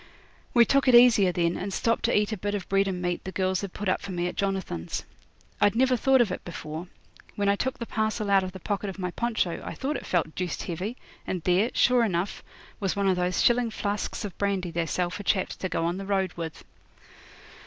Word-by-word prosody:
We 235 -1 +7
took 275 +2 +2
it 250 - +7
easier 230 -6 +7
then, 170 -1 +1
and 195 +1 -4
stopped 230 +4 0
to - - +3
eat 210 +1 +1
a 215 - -2
bit 205 +2 -2
of 195 -3 -5
bread 195 0 +2
and 180 -2 -3
meat 175 0 -1
the 190 - -5
girls 185 -1 0
had 200 -2 -5
put 205 - -5
up 185 - +1
for 200 - -6
me 175 -1 -1
at 180 - -2
Jonathan's. 190 - -2 0.6
I'd 205 +1 +4
never 255 +1 +4
thought 265 +2 +4
of 220 -6 +1
it - - -5
before. 160 0 -6 0.5
When 200 -1 0
I 200 - +4
took 260 +5 -2
the 235 - -5
parcel 215 -2 -1
out 195 -1 +5
of 185 - -4
the 190 - -9
pocket 205 +2 -2
of 195 - -7
my 180 -2 -3
poncho 220 -5 -1
I - - -6
thought 275 +1 -2
it - - -9
felt 165 -3 0
deuced 180 -3 -3
heavy, 190 +8 -4 0.3
and 180 -3 -3
there, 185 +7 +3
sure 250 -2 +4
enough, 185 -3 -1 0.4
was 195 -3 -1
one 200 -1 +1
of 190 - +3
those 180 0 0
shilling 240 -1 +3
flasks 205 0 -3
of 200 - -7
brandy 195 -3 0
they 165 0 -1
sell 175 +1 -1
for 185 - -5
chaps 190 -2 0
to 185 - -3
go 165 - -1
on 175 +2 -1
the 195 0 -6
road 190 -3 0
with. 165 -2 -7
195 Hz, 240 wpm, -27 LUFS, 180-215 Hz, 0.6 s, We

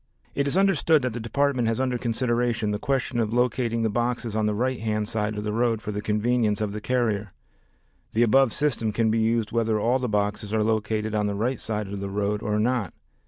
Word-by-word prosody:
It 140 0 0
is 140 - +1
understood 165 -6 +3
that 125 -3 -1
the 120 - -4
Department 125 +1 0
has 115 +1 0
under 130 -2 0
consideration 120 -2 0
the 105 - -2
question 130 -2 -1
of 110 -2 0
locating 120 -1 +1
the 110 - +2
boxes 120 -1 -1
on 110 -1 +1
the 105 - 0
right 130 +3 -1
hand 110 -1 -1
side 105 -1 -2
of 105 - -3
the 105 0 -2
road 115 -1 +1
for 105 - -5
the 105 0 -3
convenience 105 0 +1
of 105 -2 -1
the 105 +1 -5
carrier. 110 -6 -1 0.8
The 115 - +3
above 130 +2 +4
system 115 -7 0
can 110 0 +2
be 115 - +1
used 110 -1 +1
whether 115 -2 +1
all 120 +5 +2
the 125 -2 -2
boxes 105 +1 -1
are 110 - +2
located 110 0 -1
on 105 -1 +1
the 100 - -2
right 120 +4 -1
side 105 -2 -3
of 100 0 -5
the 100 0 -4
road 105 +1 -1
or 105 0 -1
not. 115 -2 0
110 Hz, 225 wpm, -25 LUFS, 105-125 Hz, 0.8 s, above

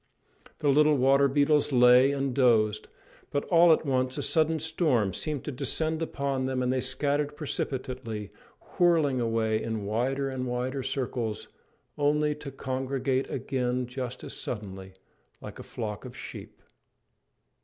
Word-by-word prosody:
The 145 - 0
little 150 +1 +4
water 135 +2 +4
beetles 145 +2 +2
lay 125 +1 +6
and 135 -2 -1
dozed; 110 -5 +2 0.4
but 145 - -1
all 170 -1 +6
at 160 - +3
once 130 -1 0
a 145 - -2
sudden 160 +1 +2
storm 150 - +1
seemed 150 - -3
to - - -4
descend 155 +4 -1
upon 140 -4 -2
them 130 -1 -1
and 125 +1 +1
they 130 - 0
scattered 145 +3 -1
precipitately, 130 -7 -4 0.5
whirling 160 -7 +3
away 110 -1 0
in 110 -3 -3
wider 130 +6 -1
and 130 -1 -3
wider 125 +2 -2
circles, 125 -4 -3 0.5
only 150 +1 +2
to 150 -1 -8
congregate 135 0 -2
again 125 -2 -2
just 125 0 -6
as - - -6
suddenly, 95 -4 -6 0.5
like - - -10
a - - -7
flock 105 -3 -6
of - - -10
sheep. - - -10
130 Hz, 145 wpm, -28 LUFS, 125-145 Hz, 0.5 s, lay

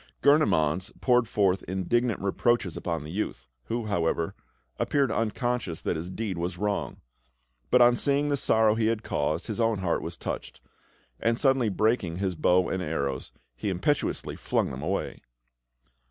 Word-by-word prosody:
Gurnemanz 95 - +3
poured 125 -2 +3
forth 95 -4 +2
indignant 110 +5 0
reproaches 100 -1 +1
upon 85 -3 -3
the 75 - -8
youth, 85 - -4 0.2
who, 115 -1 -2
however, 85 -4 0 0.5
appeared 140 -4 +1
unconscious 115 - -1
that - - -1
his 80 +3 -5
deed 95 -2 -3
was 85 +1 -3
wrong; 105 +1 -2 0.7
but 125 -1 +6
on 120 0 +6
seeing 145 +3 +1
the 145 - +2
sorrow 110 -5 +3
he 110 0 +1
had 115 0 0
caused, 75 +4 -1
his 110 0 -4
own 115 -2 +2
heart 95 -3 0
was - - -6
touched, - - -5 0.6
and 115 0 +1
suddenly, 130 -4 +3
breaking 105 -4 +1
his 95 -1 -1
bow 90 +3 +3
and 95 - -2
arrows, 70 -5 -3 0.2
he 60 - -3
impetuously 95 +11 -1
flung - - -1
them 65 - -6
away. 95 +6 -3
100 Hz, 155 wpm, -27 LUFS, 85-120 Hz, 0.7 s, but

